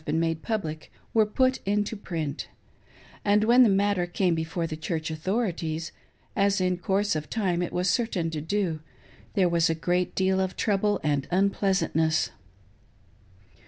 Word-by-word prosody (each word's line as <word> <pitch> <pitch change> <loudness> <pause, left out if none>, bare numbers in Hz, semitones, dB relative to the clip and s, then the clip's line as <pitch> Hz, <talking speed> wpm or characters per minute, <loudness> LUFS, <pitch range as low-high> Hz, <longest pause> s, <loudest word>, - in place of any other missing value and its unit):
been 155 +1 0
made 165 -1 0
public, 160 -9 -4 0.2
were 220 -2 +4
put 260 +4 +2
into 205 +2 0
print; 160 -7 -4 0.8
and 205 +1 +3
when 240 +3 +6
the 240 - +7
matter 195 -2 +2
came 175 0 +1
before 165 +1 -2
the 160 -1 -4
Church 160 0 -3
authorities 165 -2 -2 0.2
— - - -36
as 200 -1 +2
in 185 0 +1
course 195 +2 0
of 155 -1 -4
time 185 -6 0
it 175 - -2
was 180 +1 0
certain 180 -6 0
to 155 -2 -3
do 170 -1 -1 0.3
— - - -26
there 190 -3 +4
was 170 -1 +2
a 165 - +1
great 180 +2 -1
deal 190 0 +2
of 190 -1 -1
trouble 205 0 +1
and 145 -2 0
unpleasantness. 190 -4 +1
180 Hz, 160 wpm, -27 LUFS, 160-205 Hz, 0.8 s, the